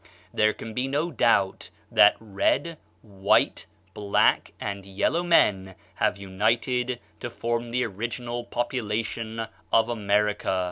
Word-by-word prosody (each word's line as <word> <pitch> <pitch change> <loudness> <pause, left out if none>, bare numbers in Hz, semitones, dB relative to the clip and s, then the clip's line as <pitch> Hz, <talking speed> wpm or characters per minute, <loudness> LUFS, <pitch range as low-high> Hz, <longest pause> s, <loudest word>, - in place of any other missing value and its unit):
There 105 0 +3
can 110 +1 -9
be 125 +3 -1
no 150 +5 -1
doubt 115 -7 +1 0.2
that 105 - +6
red, 115 - -1 0.2
white, 100 -2 +1 0.3
black, 100 -1 +2
and 100 -1 -4
yellow 100 - 0
men 95 - +2 0.2
have - - 0
united 115 +6 0 0.2
to 120 - -5
form 120 0 -3
the 125 +2 0
original 120 +3 -4
population 115 -2 -3 0.3
of 115 +1 +4
America. 105 -3 0
115 Hz, 120 wpm, -26 LUFS, 100-120 Hz, 0.3 s, that